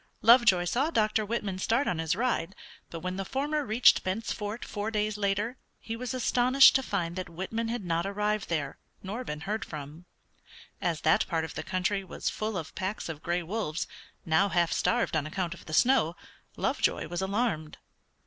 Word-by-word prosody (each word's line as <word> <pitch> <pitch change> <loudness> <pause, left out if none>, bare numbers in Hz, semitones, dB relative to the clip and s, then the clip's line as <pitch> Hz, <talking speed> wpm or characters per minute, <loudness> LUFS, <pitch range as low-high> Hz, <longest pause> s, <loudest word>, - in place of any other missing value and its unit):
Lovejoy 225 -6 +6
saw 260 - +1
Dr. 215 -6 +2
Whitman 210 -3 -3
start 230 +8 +1
on 170 - 0
his 160 0 0
ride, 220 -5 -1 0.3
but 165 - -7
when 185 +1 -3
the 195 - -2
former 290 +7 -1
reached 230 -1 +5
Bent's 200 +5 -2
Fort 210 +2 -5
four 210 +1 -3
days 215 -1 -1
later 210 +4 -1 0.2
he 225 - -5
was 250 +2 -4
astonished 255 +2 +6
to 265 - +3
find 175 -8 -2
that 185 -1 -5
Whitman 190 +7 -3
had 230 -3 -3
not 170 +1 0
arrived 210 +1 -1
there, 150 -5 -2 0.2
nor 210 +7 -4
been 150 -9 -5
heard 215 +6 -2
from. 150 +1 -8 0.8
As 165 -3 -1
that 160 - +3
part 165 -2 0
of - - -8
the - - -4
country 190 +2 -1
was 185 - -3
full 215 -2 -3
of 160 -2 -6
packs 190 -1 -3
of 155 -2 -6
gray 175 +1 -1
wolves, 170 -4 -2 0.4
now 165 +5 +3
half 170 -2 +2
starved 240 -7 +1
on 155 -1 0
account 175 +1 -2
of 190 - -14
the - - -7
snow, 225 -3 +4 0.4
Lovejoy - - 0
was 175 +3 -3
alarmed. 190 -6 -1
195 Hz, 185 wpm, -29 LUFS, 170-225 Hz, 0.8 s, Lovejoy